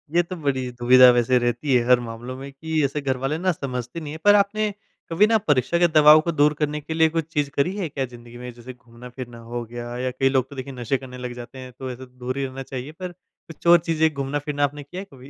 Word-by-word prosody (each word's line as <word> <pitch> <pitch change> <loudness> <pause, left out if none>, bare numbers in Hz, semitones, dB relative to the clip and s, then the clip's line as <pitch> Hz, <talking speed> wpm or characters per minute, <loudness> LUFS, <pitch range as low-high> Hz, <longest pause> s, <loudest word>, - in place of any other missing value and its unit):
ये 175 - +6
तो 185 +2 -7
बड़ी 130 -5 -2
दुविधा 125 +1 +7
वैसे 120 +1 +3
रहती 120 +3 0
है, 120 - +3
हर 125 -1 +6
मामलों 120 +2 -7
में 135 +1 -8
कि 155 +2 -2
ऐसे 145 +2 -2
घर 130 -2 -1
वाले 135 +4 -2
ना 185 +2 +1
समझते 125 0 -5
नहीं 150 -1 -7
हैं। 160 - -8
पर 205 0 +7
आपने 210 +1 +2 0.4
कभी 195 +6 +4
ना 225 -1 +4
परीक्षा 145 +4 +2
के 175 - +5
दबाव 155 -1 +7
को - - +2
दूर 150 0 +3
करने 150 0 -1
के 160 - -5
लिए 160 0 +4
कुछ 165 -1 -2
चीज़ 145 -1 0
करी 175 +8 +1
है 175 -6 -2
क्या 135 -1 -2
जिंदगी 120 -1 -13
में? 125 0 -7
जैसे 120 +2 -10
घूमना-फ़िरना 120 0 -11 0.2
हो 120 -1 -2
गया 120 +1 -7
या 130 0 -2
कई 135 +1 +1
लोग 130 -1 0
तो 140 - -11
देखिए 135 +1 -6
नशे 125 +2 -1
करने 125 -1 -10
लग 125 -1 -6
जाते 120 +2 -12
हैं, 130 0 -9
तो 130 -1 -5
ऐसे 130 +1 -9
दूर 125 +1 -6
ही 135 - -1
रहना 135 +1 -6
चाहिए। 130 +3 -7
पर 180 +2 -7
कुछ 170 -2 -13
और 170 0 +8
चीज़ें 160 0 +3
घूमना-फिरना 145 +1 -2
आपने 145 +1 -1
किया 180 +7 -8
है - - -9
कभी? 130 +1 -13
135 Hz, 260 wpm, -23 LUFS, 125-155 Hz, 0.4 s, और